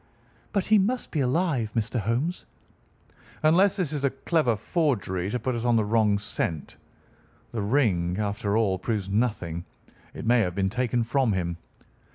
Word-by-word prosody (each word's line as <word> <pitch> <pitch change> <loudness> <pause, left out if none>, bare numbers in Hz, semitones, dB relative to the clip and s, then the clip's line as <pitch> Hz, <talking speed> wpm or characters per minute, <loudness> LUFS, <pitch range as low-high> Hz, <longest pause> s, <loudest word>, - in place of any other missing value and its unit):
"But 200 -3 0
he 215 -1 +5
must 245 +6 -1
be 155 - -1
alive, 130 -4 0
Mr. 115 +2 0
Holmes." 120 - -2 1.0
"Unless 185 +6 +4
this 170 -6 0
is 145 -2 -2
a 140 - +3
clever 140 -6 +1
forgery 105 - -1
to 125 - -1
put 130 +1 -2
us 120 -1 -3
on 120 -1 +3
the 110 -2 +2
wrong 105 -1 +3
scent. 85 -7 -4 0.8
The 115 - -3
ring, 100 -7 +1
after 105 0 -1
all, 100 -5 +1
proves 100 -2 -2
nothing. 95 -6 -1 0.5
It - - -6
may 120 +1 +4
have 90 -5 0
been 95 -1 +1
taken 125 0 0
from 120 -1 +1
him." 85 -2 -2
115 Hz, 165 wpm, -26 LUFS, 100-140 Hz, 1.0 s, he